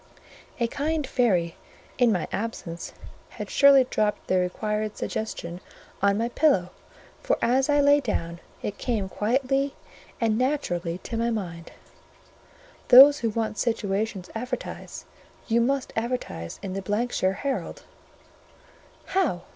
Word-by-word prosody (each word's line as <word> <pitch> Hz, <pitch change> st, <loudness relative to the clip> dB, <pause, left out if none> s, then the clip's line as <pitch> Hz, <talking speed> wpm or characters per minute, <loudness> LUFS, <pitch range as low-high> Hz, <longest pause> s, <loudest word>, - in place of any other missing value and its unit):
A 235 Hz, -, +2 dB
kind 300 Hz, +5 st, -1 dB
fairy, 190 Hz, -11 st, +1 dB, 0.4 s
in 245 Hz, -2 st, +5 dB
my 180 Hz, -5 st, -1 dB
absence, 190 Hz, -6 st, -5 dB, 0.5 s
had -, -, -6 dB
surely 280 Hz, -1 st, +7 dB
dropped 215 Hz, -4 st, -1 dB
the 185 Hz, -, +2 dB
required 210 Hz, +4 st, -2 dB
suggestion 180 Hz, -5 st, -4 dB, 0.4 s
on 200 Hz, 0 st, +3 dB
my 230 Hz, +2 st, 0 dB
pillow; 240 Hz, -, +2 dB, 0.5 s
for -, -, +1 dB
as 260 Hz, +4 st, +2 dB
I 290 Hz, 0 st, +4 dB
lay 285 Hz, +1 st, +5 dB
down, 170 Hz, -10 st, -3 dB, 0.2 s
it 205 Hz, -, -4 dB
came 220 Hz, -6 st, -1 dB
quietly 270 Hz, +6 st, 0 dB, 0.4 s
and 225 Hz, -1 st, +1 dB
naturally 180 Hz, -, -1 dB
to 230 Hz, -, -4 dB
my 230 Hz, +1 st, +1 dB
mind:—"Those 245 Hz, -, +2 dB
who 230 Hz, -, 0 dB
want 220 Hz, -1 st, -2 dB
situations 205 Hz, -4 st, -2 dB
advertise; 250 Hz, +2 st, -6 dB, 0.4 s
you 235 Hz, 0 st, +3 dB
must 270 Hz, +2 st, 0 dB
advertise 225 Hz, -, -4 dB
in 190 Hz, -2 st, -4 dB
the 195 Hz, -, -3 dB
——shire 205 Hz, -1 st, 0 dB
Herald." 275 Hz, +6 st, -4 dB, 1.2 s
"How? 295 Hz, -, 0 dB
225 Hz, 125 wpm, -25 LUFS, 195-265 Hz, 1.2 s, surely